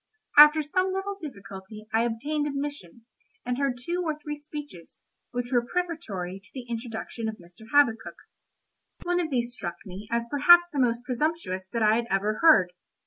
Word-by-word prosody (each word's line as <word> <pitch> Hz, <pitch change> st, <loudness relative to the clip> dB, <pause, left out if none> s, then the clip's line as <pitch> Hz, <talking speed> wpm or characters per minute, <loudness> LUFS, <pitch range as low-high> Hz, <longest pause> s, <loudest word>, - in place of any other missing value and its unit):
After 300 Hz, +1 st, +8 dB
some 370 Hz, +6 st, 0 dB
little 385 Hz, +1 st, -3 dB
difficulty 200 Hz, -6 st, -9 dB
I 225 Hz, +1 st, +3 dB
obtained 290 Hz, +6 st, -2 dB
admission, 275 Hz, -, -6 dB, 0.4 s
and 250 Hz, +1 st, -2 dB
heard 275 Hz, -3 st, 0 dB
two 340 Hz, +9 st, -3 dB
or 310 Hz, -3 st, -2 dB
three 300 Hz, 0 st, -6 dB
speeches, 290 Hz, -, -10 dB, 0.3 s
which 245 Hz, 0 st, -4 dB
were 240 Hz, -2 st, +3 dB
prefatory 240 Hz, -, -4 dB
to 195 Hz, -, -18 dB
the 255 Hz, -2 st, -6 dB
introduction 230 Hz, -1 st, -5 dB
of 220 Hz, -, -6 dB
Mr. 180 Hz, +5 st, -16 dB
Habakkuk. 240 Hz, -6 st, +3 dB, 0.9 s
One 355 Hz, 0 st, 0 dB
of 335 Hz, -3 st, -1 dB
these 240 Hz, -3 st, -1 dB
struck 175 Hz, -8 st, -5 dB
me 195 Hz, +2 st, -9 dB
as 235 Hz, 0 st, -1 dB
perhaps 345 Hz, +7 st, +6 dB
the 285 Hz, -, -1 dB
most 240 Hz, -1 st, +1 dB
presumptuous 250 Hz, -, -2 dB
that 230 Hz, -1 st, 0 dB
I 215 Hz, +1 st, +4 dB
had 235 Hz, 0 st, -2 dB
ever 205 Hz, +2 st, 0 dB
heard. 190 Hz, -, +6 dB
245 Hz, 170 wpm, -26 LUFS, 220-300 Hz, 0.9 s, After